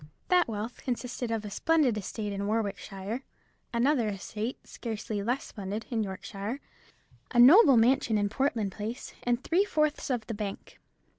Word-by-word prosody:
That 360 -1 +4
wealth 225 +1 -5
consisted 250 -1 -3
of 225 -2 -2
a 205 - -6
splendid 300 0 +2
estate 210 0 -4
in 200 0 -2
Warwickshire; 210 +1 -2 0.5
another 240 0 +2
estate, 210 +4 -4
scarcely 220 -2 -4
less 245 +6 -1
splendid, 205 +1 -5
in 230 -2 +1
Yorkshire; 200 +4 -4 0.7
a 245 - -3
noble 275 - +9
mansion 235 -1 +3
in 205 0 +2
Portland 225 -3 0
Place; 220 +6 -6
and 245 +1 0
three 355 +4 +3
fourths 305 -6 0
of 245 -4 -1
the 230 - -4
bank. 205 -2 -6
225 Hz, 150 wpm, -29 LUFS, 210-255 Hz, 0.7 s, noble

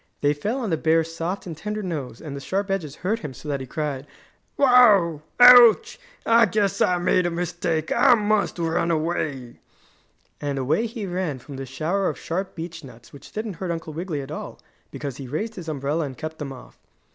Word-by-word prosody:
They 145 0 +3
fell 210 - -3
on 225 -7 -3
the 160 - +1
bear's 165 +1 +1
soft 170 +4 -4
and 170 -3 -6
tender 210 +5 -4
nose 145 -10 -5
and 145 -3 -7
the - - -5
sharp 195 +5 -2
edges 160 -7 -3
hurt 220 +4 +1
him 145 - -7
so 150 - -11
that 140 -1 -1
he 130 - -7
cried: 145 -3 -4 0.5
"Wow! 215 - +5 0.2
Ouch! 245 - +8 0.3
I 230 0 +5
guess 205 -3 0
I 180 - +3
made 180 0 +2
a - - 0
mistake! 170 -2 -2
I 265 -3 +5
must 210 -3 0
run 165 0 0
away!" 155 -6 -2 0.8
And 145 -1 -2
away 155 - +1
he 225 -2 -6
ran 180 -6 -2
from 135 +2 -10
the 135 0 -6
shower 165 +9 -1
of - - -5
sharp 185 +3 -4
beech 165 0 -7
nuts 120 -3 -14
which 140 - -13
didn't 215 -4 -5
hurt 185 +1 -4
Uncle 165 -2 -4
Wiggily 165 -2 -4
at 135 +1 -9
all 155 - -7 0.3
because 140 -4 -6
he 135 - -7
raised 210 - -3
his 175 -6 -7
umbrella 150 +2 -1
and 130 -2 -8
kept 160 0 -6
them 145 -3 -5
off. 130 - -13
165 Hz, 205 wpm, -24 LUFS, 145-200 Hz, 0.8 s, Ouch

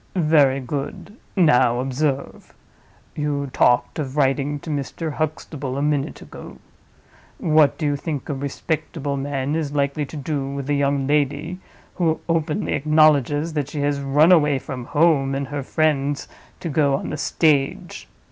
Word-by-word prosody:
"Very 150 -6 +4
good. 140 - -5 0.2
Now 125 - +4
observe! 135 +2 -3 0.6
You 145 -2 -2
talked 125 +5 +2
of 140 -1 -4
writing 140 +1 +1
to 160 - -6
Mr. 150 +2 -3
Huxtable 150 -3 -4
a - - -1
minute 145 -2 -1
ago. - - -11 0.8
What 155 -3 +3
do 155 - -3
you 145 -1 +1
think 145 -1 -4
a 145 - -2
respectable 145 +1 -3
man 140 +1 -2
is 150 -3 -2
likely 140 +1 0
to 155 - -8
do 140 -1 -3
with 140 -1 -5
a - - +3
young 140 -1 +1
lady 150 +4 0 0.4
who 165 -3 +1
openly 165 +2 0
acknowledges 150 +1 +3
that 145 -3 -2
she 145 0 -4
has 145 0 0
run 145 +5 +4
away 150 -5 +4
from 125 -1 -6
her - - -17
home 145 -4 +3
and 135 -1 -3
her 145 -1 -3
friends 145 0 0 0.3
to 170 - -3
go 140 -2 +2
on - - -4
the 155 - -3
stage? 145 -2 0
145 Hz, 155 wpm, -22 LUFS, 140-155 Hz, 0.8 s, Very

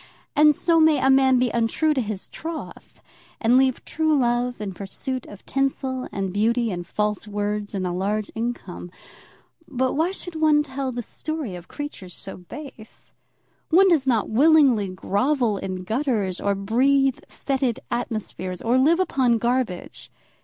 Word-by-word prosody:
And 300 0 +6
so 335 +2 +2
may 315 -1 +5
a 265 0 +3
man 265 -1 +5
be 250 -2 +1
untrue 235 +7 +1
to 265 - 0
his 210 -4 -5
troth, 320 0 -8 0.4
and 235 +2 +3
leave 260 -1 +2
true 315 -1 +1
love 245 -1 0
in 205 -2 -4
pursuit 245 +8 -5
of 205 - -13
tinsel, 265 -1 -1
and 195 -2 -3
beauty, 230 +2 +1
and 175 -1 -5
false 210 0 -2
words, 205 0 -3
and 190 -1 -2
a 180 - -1
large 200 +4 -2
income. 225 -6 -5 0.8
But 260 0 0
why 320 +4 +1
should 360 -2 -7
one 310 -1 +4
tell 270 -2 -4
the 240 -1 -4
story 310 - -5
of 175 -1 -9
creatures 245 - -7
so 195 - -7
base? 225 - -11 0.6
One 380 +4 +6
does 300 -6 +2
not 230 -5 +2
willingly 270 -4 +4
grovel 215 +5 0
in 185 -1 -5
gutters, 220 -4 -1
or 200 0 +1
breathe 260 +6 +2
fetid 265 -4 -1
atmospheres, 215 -6 -4
or 240 +3 +2
live 320 +6 +4
upon 260 -10 +2
garbage. 235 -5 -2
245 Hz, 155 wpm, -23 LUFS, 205-275 Hz, 0.8 s, And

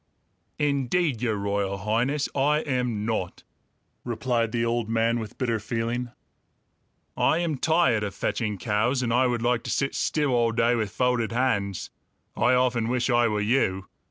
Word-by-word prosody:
"Indeed, 140 -1 0
Your 115 -3 0
Royal 100 -1 -1
Highness, 120 +8 0
I 150 +2 +2
am 125 -7 -1
not!" 110 -6 -3 0.6
replied 115 -1 -1
the 115 0 0
old 115 -1 -1
man 115 +1 +1
with 110 -2 -8
bitter 115 -3 0
feeling. 115 +3 -3 1.1
"I - - +2
am 165 -5 -1
tired 160 -9 +3
of 100 - -4
fetching 105 -4 -2
cows, 115 +6 0
and 115 -1 0
I 125 +1 +4
would 120 -2 -1
like 120 -1 +2
to - - -4
sit 135 - 0
still 150 -3 0
all 120 -2 +2
day 115 +1 +2
with 110 -4 -1
folded 125 0 0
hands. 105 -6 -1 0.4
I 130 - +3
often 125 -3 +1
wish 125 +1 0
I 120 0 +4
were 105 -1 -1
you. 105 -4 0
120 Hz, 160 wpm, -26 LUFS, 110-130 Hz, 1.1 s, I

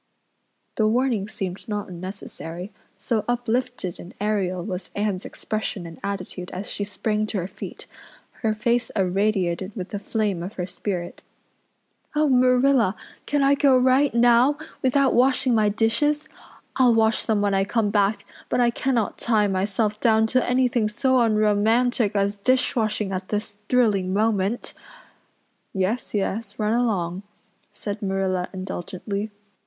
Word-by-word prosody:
The 215 - +3
warning 230 -3 +1
seemed 195 -1 -6
not 210 -1 -2
unnecessary, 180 0 -7 0.2
so 225 -3 -1
uplifted 245 -5 -1
and 175 - -11
aerial 195 -4 -1
was 185 -3 -5
Anne's 205 -2 -1
expression 215 -4 -4
and 165 -1 -10
attitude 185 -2 -5
as 190 +3 -5
she 205 - -2
sprang 210 +1 -1
to 215 - -2
her 180 -1 -2
feet, - - -9 0.6
her 220 -2 +1
face 235 +3 +1
irradiated 190 -1 0
with 185 -3 -5
the 205 - -4
flame 205 -4 -1
of 185 +5 -6
her 180 - -3
spirit. 180 -1 -4 0.9
"Oh, 300 0 +3
Marilla, 255 -4 +4 0.3
can 290 -1 +1
I 275 +1 +5
go 280 -2 +4
right 260 +3 +4
now 240 +4 +4 0.2
without 270 0 +3
washing 255 0 +3
my 215 -2 +3
dishes? 235 +8 +1 0.5
I'll 250 -3 +5
wash 220 0 +2
them 220 -2 +1
when 205 -1 +1
I 195 0 +3
come 210 0 0
back, 200 0 +1 0.2
but - - +1
I 240 -1 +4
cannot 235 -3 -1
tie 220 -3 +2
myself 205 +2 0
down 220 -2 +4
to 255 -1 +2
anything 250 -3 +2
so 260 +4 +2
unromantic 220 +1 +2
as 200 0 0
dishwashing 215 -3 +1
at 185 0 -4
this 210 -1 -3
thrilling 205 -7 +2
moment." 215 +1 0 1.0
"Yes, 200 +5 -1
yes, 205 +1 -2
run 215 0 +1
along," 195 -7 0 0.5
said 205 0 -5
Marilla 190 -2 -1
indulgently. 190 +2 -5
215 Hz, 140 wpm, -24 LUFS, 195-240 Hz, 1.0 s, I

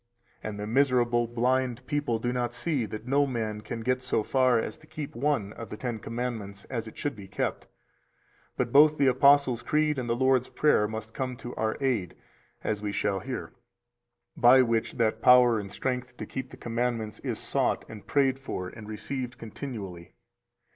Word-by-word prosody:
316 - - -4
And 105 -1 -7 0.2
the - - +6
miserable 120 -3 +3
blind 125 +1 0
people 145 -6 0
do 120 +2 -2
not 120 -1 -2
see 125 -2 -1
that 110 +1 -7
no 140 +2 +3
man 110 -4 -3
can 115 +2 -5
get 125 +2 0
so 125 -3 0
far 130 0 +3
as 110 - -2
to 155 - -19
keep 150 -2 -6
one 120 -6 0
of 115 -3 -8
the 105 - -6
Ten 120 -2 -3
Commandments 110 -3 -4
as 115 -3 -3
it 110 - -11
should 145 - -2
be 100 -2 -10
kept, 100 - -3 0.9
but 120 -2 0
both 150 +2 +7
the 140 - +3
Apostles' 135 -1 +5
Creed 150 0 +1
and 120 -2 -4
the 115 - +2
Lord's 130 0 +2
Prayer 150 -8 +3
must 110 0 -6
come 130 -2 -3
to 120 - -7
our 110 0 -1
aid 125 - 0 0.5
(as 105 -1 -1
we 105 -1 -2
shall 100 -1 0
hear), 130 +3 -6 0.8
by 130 +2 +7
which 115 -1 0
that 115 -2 0
[power 125 -2 +6
and 100 -2 -7
strength 125 +2 -3
to - - -5
keep 130 -1 -5
the - - -12
commandments] 115 -2 -2
is - - -3
sought - - 0
and 105 -2 -11
prayed 135 -2 +2
for 90 -9 -5
and 105 +1 -11
received 125 +3 -4
continually. 105 -7 -7
120 Hz, 190 wpm, -28 LUFS, 110-130 Hz, 0.9 s, both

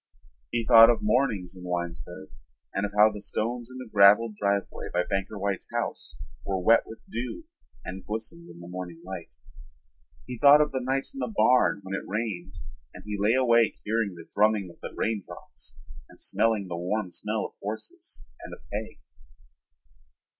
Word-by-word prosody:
He 115 -1 -1
thought 115 -1 +9
of 120 - +2
mornings 105 -5 +1
in 90 - -11
Winesburg 85 -6 -5 0.4
and 100 +1 0
of - - -12
how 105 +1 +7
the 105 -1 -8
stones 120 +3 -3
in 130 - -10
the 130 -1 -7
graveled 105 +2 +6
driveway 100 -1 -1
by 90 0 +1
Banker 95 +3 -3
White's 100 -1 -2
house - - -4 0.3
were 95 - -1
wet 115 +6 +4
with 110 - -9
dew 125 - -5 0.4
and 95 0 -6
glistened 115 +11 -5
in - - -12
the 85 - -10
morning 90 -2 -7
light. 95 -2 -8 0.9
He 125 -2 -7
thought 145 +1 +8
of 150 0 +2
the 130 -1 -2
nights 135 - -1
in 270 - -8
the 225 - -2
barn 125 - +3
when 95 0 -6
it 95 - -2
rained 95 -4 -4 0.4
and - - -10
he 105 0 -3
lay 105 +4 +2
awake 120 -3 +4
hearing 110 -3 -1
the 85 -1 -12
drumming 105 -3 +2
of - - -20
the - - -6
raindrops 100 - -5 0.3
and - - -18
smelling 110 -4 +1
the 90 - -4
warm 90 +2 -2
smell 105 +4 -2
of - - -8
horses 110 +1 -7 0.2
and - - -8
of - - -20
hay. - - -5
105 Hz, 175 wpm, -27 LUFS, 95-115 Hz, 0.9 s, thought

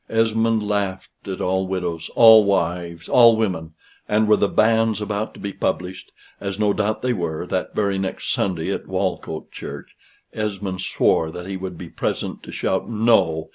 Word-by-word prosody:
Esmond 115 -1 +1
laughed 100 -2 -2 0.2
at 95 -1 -4
all 95 +1 0
widows, 90 -3 -3
all 110 -2 +9
wives, 85 -3 -1
all 115 -2 +6
women; 80 -7 -2 0.3
and 105 +1 +2
were 105 - +6
the 100 - +2
banns 110 -1 +2
about 105 +1 -3
to - - -12
be 100 -1 -5
published, 90 0 -3 0.3
as 100 -1 -4
no 105 -1 +2
doubt 105 +2 -1
they 125 -1 +1
were, 85 -4 -3
that 90 0 -3
very 100 -2 0
next 95 -1 -3
Sunday 90 -5 -1
at - - -6
Walcote - - -3
Church, - - -9 0.4
Esmond 100 -3 -3
swore 80 -3 +1
that 90 +2 -8
he 95 0 -5
would 95 -2 -6
be 90 - -8
present - - -3
to - - -10
shout 95 - -2
No! 105 -8 +2
100 Hz, 175 wpm, -22 LUFS, 90-110 Hz, 0.4 s, all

